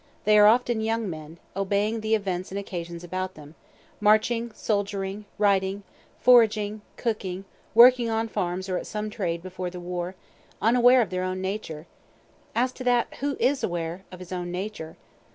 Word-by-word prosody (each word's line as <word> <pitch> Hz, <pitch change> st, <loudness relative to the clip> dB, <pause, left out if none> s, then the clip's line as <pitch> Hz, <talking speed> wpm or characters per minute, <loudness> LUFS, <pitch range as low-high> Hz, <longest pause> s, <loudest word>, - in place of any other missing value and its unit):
They 210 Hz, 0 st, +5 dB
are 210 Hz, -, +8 dB
often 240 Hz, 0 st, +3 dB
young 225 Hz, 0 st, -1 dB
men, 160 Hz, -1 st, -7 dB, 0.2 s
obeying 205 Hz, +3 st, 0 dB
the 220 Hz, +1 st, +2 dB
events 185 Hz, -3 st, -3 dB
and 195 Hz, -, -5 dB
occasions 175 Hz, -3 st, -6 dB
about 185 Hz, +2 st, -4 dB
them, 150 Hz, 0 st, -13 dB, 0.5 s
marching, 220 Hz, +3 st, +3 dB
soldiering, 200 Hz, -1 st, -2 dB
righting, 200 Hz, -1 st, +1 dB, 0.4 s
foraging, 215 Hz, -4 st, +4 dB, 0.2 s
cooking, 195 Hz, -5 st, -3 dB, 0.3 s
working 240 Hz, 0 st, +7 dB
on 225 Hz, 0 st, 0 dB
farms 185 Hz, -2 st, -3 dB
or 185 Hz, -1 st, -1 dB
at -, -, -8 dB
some 215 Hz, 0 st, -4 dB
trade 170 Hz, -6 st, -3 dB
before 185 Hz, -1 st, -5 dB
the 180 Hz, 0 st, -8 dB
war 175 Hz, +1 st, -4 dB, 0.4 s
unaware 245 Hz, +3 st, +5 dB
of 210 Hz, -, -8 dB
their 185 Hz, 0 st, -1 dB
own 185 Hz, 0 st, -2 dB
nature, 190 Hz, -5 st, -4 dB, 0.7 s
(as 250 Hz, +2 st, +2 dB
to 255 Hz, -, -9 dB
that, 245 Hz, -1 st, +2 dB
who 280 Hz, 0 st, -2 dB
is 270 Hz, -1 st, +1 dB
aware 170 Hz, 0 st, -3 dB
of 185 Hz, -, -9 dB
his 180 Hz, 0 st, -11 dB
own 180 Hz, -1 st, -3 dB
nature?) 180 Hz, -3 st, -5 dB
200 Hz, 165 wpm, -26 LUFS, 180-225 Hz, 0.7 s, are